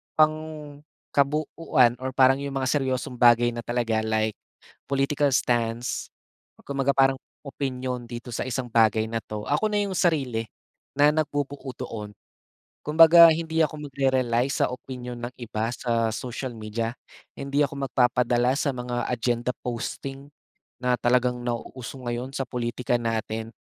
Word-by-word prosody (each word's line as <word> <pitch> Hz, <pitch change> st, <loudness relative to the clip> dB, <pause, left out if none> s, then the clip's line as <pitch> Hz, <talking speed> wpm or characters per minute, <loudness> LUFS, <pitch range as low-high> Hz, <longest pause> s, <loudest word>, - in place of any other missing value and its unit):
pangkabuuan 150 Hz, -3 st, 0 dB
or 130 Hz, 0 st, -3 dB
parang 135 Hz, +1 st, +5 dB
'yong 140 Hz, -1 st, -5 dB
mga 130 Hz, -1 st, 0 dB
seryosong 130 Hz, -3 st, -1 dB
bagay 120 Hz, 0 st, +5 dB
na 120 Hz, -, -6 dB
talaga, 120 Hz, -2 st, 0 dB
like 110 Hz, 0 st, +1 dB, 0.6 s
political 140 Hz, +1 st, +1 dB
stance, 120 Hz, -2 st, 0 dB, 0.6 s
kumbaga 140 Hz, 0 st, 0 dB
parang 135 Hz, -1 st, +4 dB, 0.3 s
opinyon 130 Hz, -3 st, -4 dB
dito 120 Hz, +1 st, -7 dB
sa -, -, -2 dB
isang 130 Hz, 0 st, -3 dB
bagay 110 Hz, -1 st, +3 dB
na 115 Hz, -, -1 dB
'to 105 Hz, -1 st, -6 dB
ako 150 Hz, +10 st, +1 dB
na -, -, -1 dB
'yong 200 Hz, -, -3 dB
sarili, 135 Hz, -, +1 dB, 0.5 s
na 145 Hz, +1 st, +5 dB
nagbubuo 145 Hz, -3 st, -2 dB
doon. 110 Hz, -5 st, -6 dB, 0.7 s
Kumbaga 165 Hz, +2 st, +8 dB
hindi 160 Hz, 0 st, -1 dB
ako 150 Hz, -1 st, -3 dB
magre-rely 130 Hz, -3 st, +1 dB
sa -, -, +1 dB
opinyon 125 Hz, -2 st, -6 dB
ng 125 Hz, -, -11 dB
iba 115 Hz, -1 st, -3 dB
sa 115 Hz, -2 st, 0 dB
social 125 Hz, +2 st, -5 dB
media, 110 Hz, +1 st, -3 dB, 0.5 s
hindi 140 Hz, +1 st, +1 dB
ako 140 Hz, 0 st, -4 dB
magpapadala 125 Hz, 0 st, +2 dB
sa 140 Hz, -, +1 dB
mga 120 Hz, -1 st, -3 dB
agenda 120 Hz, 0 st, 0 dB
posting, 135 Hz, +3 st, -5 dB, 0.5 s
na 125 Hz, -1 st, +2 dB
talagang 125 Hz, 0 st, +2 dB
nauuso 120 Hz, +2 st, -5 dB
ngayon 120 Hz, +2 st, -4 dB
sa 135 Hz, -, -1 dB
pulitika 120 Hz, 0 st, -1 dB
natin, 115 Hz, -1 st, -3 dB
125 Hz, 135 wpm, -25 LUFS, 120-140 Hz, 0.7 s, Kumbaga